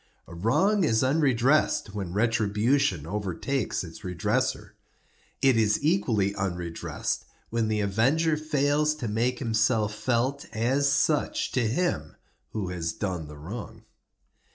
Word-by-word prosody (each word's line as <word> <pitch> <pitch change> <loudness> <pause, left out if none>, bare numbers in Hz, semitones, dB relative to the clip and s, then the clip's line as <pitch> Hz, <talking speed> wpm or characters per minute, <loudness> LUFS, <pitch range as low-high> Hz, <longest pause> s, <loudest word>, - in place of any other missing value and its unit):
A - - -12
wrong 180 - +2
is 110 -7 +2
unredressed 130 -5 +2
when 100 -4 -4
retribution 110 - +1
overtakes 105 +8 -2
its 80 -2 -9
redresser. 90 -3 -1 0.7
It 135 -3 +5
is 105 -2 +3
equally 115 - +2
unredressed 90 -4 -3 0.3
when 115 -1 0
the 110 -1 0
avenger 135 +11 +2
fails 150 0 +1
to 130 -6 -4
make 120 +4 0
himself 110 -2 +1
felt 125 +5 -1
as 130 +5 +2
such 150 +2 +1
to 125 -4 +1
him 175 +10 -1 0.3
who 105 -5 -3
has 85 -2 -3
done 90 -7 -3
the 75 0 -10
wrong. 95 +6 -8
115 Hz, 125 wpm, -27 LUFS, 100-140 Hz, 0.7 s, It